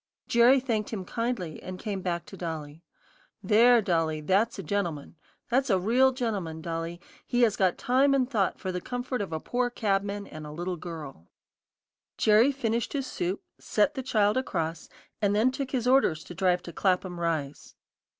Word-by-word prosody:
Jerry 240 +3 +5
thanked 225 -5 -2
him 195 -5 -5
kindly, 230 -8 -3
and 185 0 -7
came 200 -1 -4
back 175 -2 -2
to - - -11
Dolly. 160 -3 -6 0.6
"There, 230 +4 +5
Dolly, 165 -4 0
that's 195 +9 +1
a 195 - -5
gentleman; 170 -5 -3 0.4
that's 265 +2 +2
a 190 - +4
real 245 +8 +4
gentleman, 205 - -3
Dolly; 165 +1 -4 0.2
he 245 0 +1
has 220 -3 +3
got 185 -3 +2
time 270 +3 +3
and 260 -2 +2
thought 215 -7 0
for 185 - -3
the 180 0 -3
comfort 250 +1 -3
of 195 - -4
a 160 - -2
poor 245 +7 -1
cabman 200 -3 -1
and 155 -4 -9
a - - -8
little 175 +4 -3
girl." 155 - -8 0.9
Jerry 220 +6 +5
finished 235 -4 -2
his 275 -2 -1
soup, 185 -6 -3 0.2
set 215 +8 +1
the 265 - -4
child 215 -4 +2
across, 170 -10 -2 0.3
and 205 -1 +2
then 230 +5 +3
took 265 0 -4
his 250 -3 -1
orders 250 -12 +3
to - - -10
drive 180 0 +1
to 170 - -9
Clapham 180 -1 0
Rise. 155 -4 -3
200 Hz, 180 wpm, -28 LUFS, 170-245 Hz, 0.9 s, Jerry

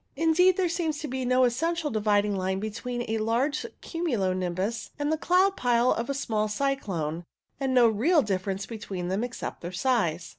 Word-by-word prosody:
Indeed, 330 +4 +4
there 375 -2 +2
seems 335 -3 -1
to 300 - -4
be 260 -1 -3
no 255 +1 +3
essential 315 +6 0
dividing 210 -2 +2
line 190 0 -1
between 240 +3 -4
a 220 0 -1
large 240 +7 0
cumulo 245 - -1
nimbus 185 +5 -2
and 290 0 -1
the - - +3
cloud 370 +4 +3
pile 245 -3 +2
of 235 +3 -1
a 280 - -1
small 215 -6 -1
cyclone, 200 - -2 0.4
and 270 -1 0
no 245 -2 +7
real 275 - +3
difference 195 -1 -2
between 195 -5 -5
them 195 +5 0
except 245 0 -5
their 175 - -5
size. 180 -5 0
235 Hz, 180 wpm, -27 LUFS, 200-290 Hz, 0.4 s, no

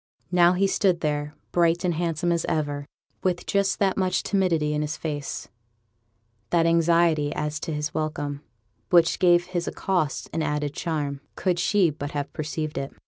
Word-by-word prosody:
Now 175 0 +5
he 190 +2 +2
stood 190 -3 +2
there, 150 0 -2 0.2
bright 170 0 +2
and 175 - +2
handsome 170 +1 -1
as 170 -1 +1
ever, 145 -3 -2 0.3
with 180 -2 -1
just 200 -1 +1
that 195 -2 +1
much 185 -2 +1
timidity 170 -7 +1
in 150 - 0
his 150 0 -3
face, 145 -3 -4 1.0
that 170 -1 +3
anxiety 165 -2 +3
as 150 0 -2
to 165 - -4
his 150 0 -3
welcome, 145 -2 -3 0.5
which 170 -1 +4
gave 175 -1 +5
his 175 -1 -3
accost 180 -7 -1
an 165 - -1
added 150 -1 -1
charm, 145 -4 -3
could 180 -2 0
she 185 -2 +3
but 145 -1 -6
have 145 -1 -3
perceived 155 0 -3
it. 135 - -5
165 Hz, 165 wpm, -25 LUFS, 150-175 Hz, 1.0 s, Now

